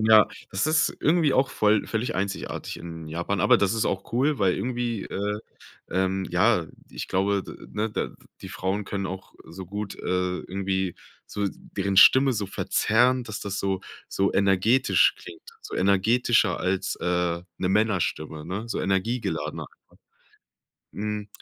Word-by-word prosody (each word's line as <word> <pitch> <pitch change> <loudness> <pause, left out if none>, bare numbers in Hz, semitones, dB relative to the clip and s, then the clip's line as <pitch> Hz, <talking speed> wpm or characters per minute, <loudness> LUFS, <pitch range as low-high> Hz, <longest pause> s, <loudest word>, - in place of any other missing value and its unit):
Ja, 110 -1 +6 0.2
das 95 +8 0
ist 160 +1 +2
irgendwie 155 -3 +3
auch 135 +1 +2
voll 105 -1 +2
völlig 110 +2 -2
einzigartig 95 +1 -3
in 80 -2 -8
Japan, 85 +5 -2
aber - - +6
das 100 +2 +2
ist 110 - 0
auch 95 +3 -3
cool, 135 +4 +2
weil 95 -3 +3
irgendwie, 120 0 -2
äh, 105 +1 -3 0.5
ähm, 95 +1 0
ja, - - +3 0.2
ich - - -6
glaube, 100 +1 +1
de - - -11
ne, 110 +1 -1
de - - -2 0.3
die - - -8
Frauen 95 +3 -2
können 100 -1 -3
auch 95 0 -8
so 90 +3 -8
gut, 100 +2 -5
äh, - - -11 0.4
irgendwie 95 -1 -2 0.3
so 100 -1 -2
deren 100 +1 -4
Stimme 130 +7 +7
so 105 -4 -2
verzerren, 125 +5 +2
dass 110 -2 -6
das 100 -1 -4
so 95 -1 -1 0.3
so 95 0 0
energetisch 100 +6 +3
klingt 380 -2 -11 0.2
so - - -7
energetischer 105 +1 +3
als, 95 +1 -1
äh, 90 -1 0 0.2
'ne 90 - 0
Männerstimme, 95 -7 0
ne, 100 +6 -4
so - - -2
energiegeladener 95 -1 -1
einfach. - - -17 1.3
Hm. 105 -1 -3
100 Hz, 155 wpm, -25 LUFS, 95-110 Hz, 1.3 s, Stimme